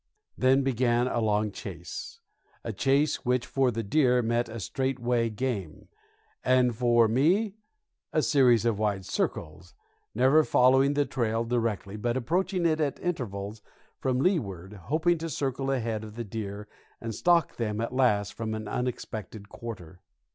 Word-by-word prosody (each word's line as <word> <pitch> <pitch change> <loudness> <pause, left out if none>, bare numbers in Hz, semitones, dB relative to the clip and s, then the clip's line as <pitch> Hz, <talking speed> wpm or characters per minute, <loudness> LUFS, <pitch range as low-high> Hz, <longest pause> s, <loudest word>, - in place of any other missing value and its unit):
Then 130 +1 +3
began 120 -2 +1
a 120 - -1
long 105 -1 +1
chase, - - -8 0.4
a - - -4
chase 140 +3 +2
which 125 0 +1
for 135 -2 +1
the 115 -1 -3
deer 125 +2 +3
meant 120 +1 0
a 115 +1 -6
straightaway 120 0 -1
game, 110 -7 -4 0.5
and 125 -2 +3
for 120 -1 +4
me 175 - +2 0.6
a - - +1
series 125 -5 +4
of 115 -3 +1
wide 100 -3 -1
circles 85 +2 -3 0.4
never 135 +6 +5
following 135 +1 +4
the 145 0 +2
trail 115 -3 -1
directly, 115 -4 -2
but 120 +3 -1
approaching 175 - 0
it 160 -1 +2
at 145 -2 -1
intervals 105 - -4 0.4
from 130 -1 0
leeward, 105 - -1
hoping 160 +4 +1
to 165 +1 -4
circle 135 -1 -2
ahead 115 -5 -1
of 105 -1 -10
the 120 - -4
deer 105 -1 -6 0.3
and 115 -1 -5
stalk 170 +9 +2
them 105 -2 -2
at 115 +2 -3
last 105 -6 +2
from 110 -1 -4
an 110 -1 -6
unexpected 110 -4 -5
quarter. 95 -7 -9
120 Hz, 150 wpm, -28 LUFS, 110-135 Hz, 0.6 s, never